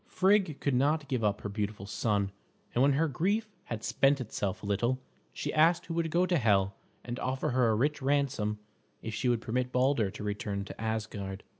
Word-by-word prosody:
Frigg 190 -5 +2
could 140 - 0
not 145 +4 +2
give 130 -5 -1
up 105 -1 +1
her - - -4
beautiful 105 -1 -3
son, 100 -2 0 0.4
and 120 - +2
when 140 +1 +5
her 160 +4 +2
grief 200 - 0
had 115 -2 -5
spent 140 +1 +3
itself 105 -4 -3
a - - -5
little, 120 +6 +1 0.3
she - - -4
asked 170 +3 +4
who 165 - -5
would 165 -1 0
go 175 +3 +3
to 175 -3 +2
Hel 100 -4 +3 0.3
and 120 0 -4
offer 130 +1 -1
her 125 -2 +3
a 110 - +3
rich 145 +6 +1
ransom 135 -6 +1 0.5
if 110 - -4
she 125 +3 0
would 120 -2 +1
permit 125 +2 -1
Balder 125 -5 +2
to 100 - -8
return 100 -1 -3
to 100 - -9
Asgard. 105 -3 -3
125 Hz, 200 wpm, -30 LUFS, 105-145 Hz, 0.5 s, when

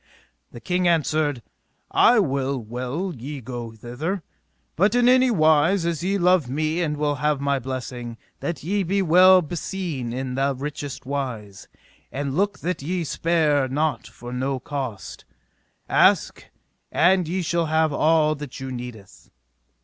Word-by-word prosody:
The 120 - -10
king 180 +6 0
answered: 155 -5 +1 0.5
I 245 - +5
will 140 -7 0
well 125 - -4
ye 135 +4 -7
go 120 -1 -6
thither, 135 - -4 0.5
but 200 +7 +2
in 245 0 +4
any 255 0 +5
wise 165 -1 +3
as 170 -1 -2
ye 195 +2 +1
love 180 -7 +3
me 155 +5 -1
and 150 -3 -1
will 145 -1 0
have 150 -2 +1
my 140 0 0
blessing, 125 -2 -6 0.2
that 165 -6 -4
ye 200 +5 0
be 195 +2 0
well 185 +2 +6
beseen 160 -6 -4
in 130 +1 -4
the 135 +1 0
richest 145 0 -6
wise; 125 -8 -5 0.4
and 140 0 -3
look 200 +3 0
that 180 -2 -2
ye 175 +4 -2
spare 155 -3 +1
not 150 +4 -1
for 120 0 -10
no 130 +1 -2
cost; 130 - -6 0.6
ask - - +3 0.5
and 180 +1 +3
ye 180 +2 -2
shall 170 0 0
have 160 -1 +2
all 155 0 +3
that 145 -3 -8
you 130 0 -6
needeth. 120 -5 -9
150 Hz, 150 wpm, -23 LUFS, 130-175 Hz, 0.6 s, well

